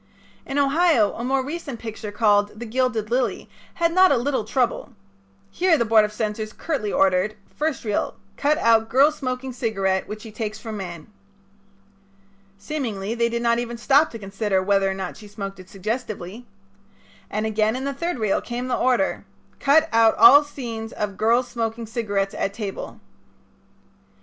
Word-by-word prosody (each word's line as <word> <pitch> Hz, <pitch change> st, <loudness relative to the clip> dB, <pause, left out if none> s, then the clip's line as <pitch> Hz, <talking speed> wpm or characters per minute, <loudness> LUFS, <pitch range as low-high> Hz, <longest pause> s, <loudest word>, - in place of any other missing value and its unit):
In 275 Hz, -, -3 dB
Ohio 285 Hz, -, +3 dB
a 235 Hz, -, -6 dB
more 265 Hz, +1 st, 0 dB
recent 290 Hz, -4 st, -5 dB
picture 220 Hz, -2 st, -6 dB
called 205 Hz, -1 st, +2 dB
"The 240 Hz, -, -5 dB
Gilded 235 Hz, -2 st, -1 dB
Lily" 250 Hz, 0 st, 0 dB, 0.3 s
had 335 Hz, -1 st, +1 dB
not 370 Hz, +1 st, +6 dB
a 275 Hz, -, +4 dB
little 260 Hz, 0 st, -1 dB
trouble. 245 Hz, +2 st, -1 dB, 0.6 s
Here 345 Hz, -, +3 dB
the 235 Hz, -, +1 dB
Board 220 Hz, -1 st, +5 dB
of 210 Hz, -, -2 dB
Censors 215 Hz, 0 st, -3 dB
curtly 275 Hz, -11 st, -3 dB
ordered: 195 Hz, +2 st, +2 dB, 0.2 s
"First 310 Hz, -1 st, -2 dB
Reel 210 Hz, -2 st, -1 dB, 0.2 s
Cut 300 Hz, +1 st, +1 dB
out 225 Hz, -6 st, +3 dB
girl 275 Hz, +4 st, +5 dB
smoking 255 Hz, -2 st, -4 dB
cigarette 195 Hz, -6 st, -1 dB
which 210 Hz, 0 st, -7 dB
she 225 Hz, -, -9 dB
takes 215 Hz, 0 st, -4 dB
from 215 Hz, 0 st, -7 dB
man." 175 Hz, -5 st, -7 dB, 1.5 s
Seemingly 215 Hz, -4 st, -4 dB
they 235 Hz, 0 st, +1 dB
did 235 Hz, 0 st, -2 dB
not 235 Hz, 0 st, +2 dB
even 240 Hz, 0 st, -4 dB
stop 280 Hz, +6 st, +4 dB
to 230 Hz, -, -8 dB
consider 195 Hz, -1 st, -1 dB
whether 195 Hz, 0 st, +2 dB
or 190 Hz, -, -2 dB
not 190 Hz, -2 st, -5 dB
she 210 Hz, -, -12 dB
smoked 195 Hz, -2 st, -7 dB
it 185 Hz, 0 st, -13 dB
suggestively. 215 Hz, +1 st, -5 dB, 0.8 s
And 215 Hz, +1 st, -2 dB
again 215 Hz, +1 st, +1 dB
in 260 Hz, -, -4 dB
the 280 Hz, -, -2 dB
third 335 Hz, +3 st, -3 dB
reel 215 Hz, -4 st, 0 dB
came 245 Hz, +1 st, -5 dB
the 250 Hz, -, +1 dB
order: 255 Hz, +3 st, +1 dB, 0.4 s
"Cut 310 Hz, +3 st, +4 dB
out 225 Hz, -1 st, +5 dB
all 300 Hz, -7 st, +8 dB
scenes 230 Hz, -6 st, -7 dB
of 205 Hz, -2 st, -3 dB
girl's 235 Hz, +4 st, +2 dB
smoking 230 Hz, -1 st, -3 dB
cigarette 205 Hz, -4 st, -2 dB
at 200 Hz, -, -2 dB
table." 205 Hz, -4 st, -6 dB
230 Hz, 170 wpm, -23 LUFS, 210-260 Hz, 1.5 s, all